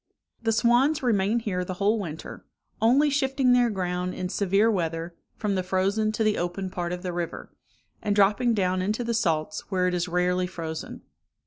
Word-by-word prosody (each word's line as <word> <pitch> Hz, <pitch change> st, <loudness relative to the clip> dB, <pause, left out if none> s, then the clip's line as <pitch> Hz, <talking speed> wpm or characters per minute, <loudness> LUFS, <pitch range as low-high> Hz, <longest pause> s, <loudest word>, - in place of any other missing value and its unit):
The 225 Hz, -1 st, +1 dB
swans 245 Hz, +7 st, +3 dB
remain 220 Hz, -1 st, +2 dB
here 185 Hz, -5 st, -2 dB
the 185 Hz, 0 st, -5 dB
whole 205 Hz, +4 st, +1 dB
winter, 160 Hz, -5 st, -7 dB, 0.4 s
only 270 Hz, +6 st, +4 dB
shifting 270 Hz, -2 st, +2 dB
their 245 Hz, -1 st, +4 dB
ground 180 Hz, -2 st, -2 dB
in 180 Hz, -, -3 dB
severe 200 Hz, +3 st, +2 dB
weather, 165 Hz, -3 st, -2 dB, 0.2 s
from 210 Hz, -2 st, -1 dB
the 190 Hz, -, 0 dB
frozen 195 Hz, +4 st, 0 dB
to 220 Hz, -, 0 dB
the 215 Hz, -1 st, +1 dB
open 180 Hz, +2 st, -3 dB
part 175 Hz, -1 st, -3 dB
of 180 Hz, +1 st, -5 dB
the 180 Hz, -1 st, -3 dB
river, 170 Hz, -1 st, -5 dB, 0.5 s
and 210 Hz, -2 st, 0 dB
dropping 210 Hz, +4 st, +3 dB
down 185 Hz, -2 st, +1 dB
into 210 Hz, +5 st, -1 dB
the 235 Hz, 0 st, -1 dB
salts, 155 Hz, -8 st, -1 dB
where 185 Hz, -2 st, +1 dB
it 180 Hz, -, 0 dB
is 175 Hz, +1 st, -1 dB
rarely 180 Hz, +1 st, +1 dB
frozen. 160 Hz, -3 st, -6 dB
195 Hz, 185 wpm, -26 LUFS, 180-225 Hz, 0.5 s, only